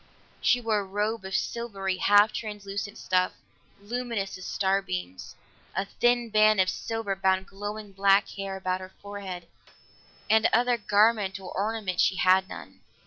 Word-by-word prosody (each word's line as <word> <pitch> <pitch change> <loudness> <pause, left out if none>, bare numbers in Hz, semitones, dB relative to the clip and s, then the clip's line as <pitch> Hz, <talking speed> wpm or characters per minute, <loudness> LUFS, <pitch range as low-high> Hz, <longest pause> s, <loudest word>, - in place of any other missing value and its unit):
She 245 - +4
wore 225 -3 +1
a - - -3
robe 205 +2 -2
of 190 0 -3
silvery, 195 -5 -2
half 205 +3 +5
translucent 205 -1 -5
stuff, 185 0 +1 0.5
luminous 225 -2 -3
as 185 - -8
starbeams; 95 - -2 0.4
a 195 - 0
thin 240 +2 +1
band 215 -1 +5
of 185 0 +3
silver 225 -2 -3
bound 190 0 +1
glowing 205 +1 -7
black 195 +1 +3
hair 195 -1 -5
about 185 -1 -2
her 185 0 -10
forehead, 195 -4 -7 0.8
and 220 0 +4
other 245 +1 +3
garment 205 -2 +2
or 185 -1 -9
ornament 205 -2 -1
she - - +3
had 185 +1 +3
none. - - -10
200 Hz, 145 wpm, -27 LUFS, 190-215 Hz, 0.8 s, half